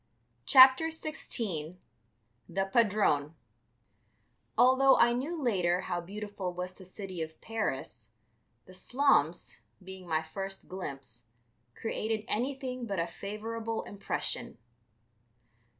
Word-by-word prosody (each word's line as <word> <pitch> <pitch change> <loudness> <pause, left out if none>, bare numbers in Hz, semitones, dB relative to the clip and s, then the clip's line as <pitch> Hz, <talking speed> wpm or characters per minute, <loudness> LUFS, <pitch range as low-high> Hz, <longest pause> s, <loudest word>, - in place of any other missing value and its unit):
CHAPTER 260 +4 +8
XVI 220 - -4 0.7
THE 195 +3 0
PADRONE 195 -8 +2 1.2
Although 260 +2 +6
I 240 0 +5
knew 295 +8 -2
later 185 - +1
how 175 -1 -2
beautiful 200 -1 -5
was 180 +1 -4
the 185 - -14
city 185 -2 -7
of 160 0 -6
Paris, 135 - -4 0.5
the 185 - -14
slums, 185 - +1 0.2
being 190 -1 -10
my 160 -1 +1
first 195 +4 -6
glimpse, 135 - -6 0.5
created 220 -1 -2
anything 255 +1 -2
but 200 -2 -2
a 165 - +1
favorable 220 +5 -4
impression. 200 -1 -3
195 Hz, 105 wpm, -31 LUFS, 175-235 Hz, 1.2 s, CHAPTER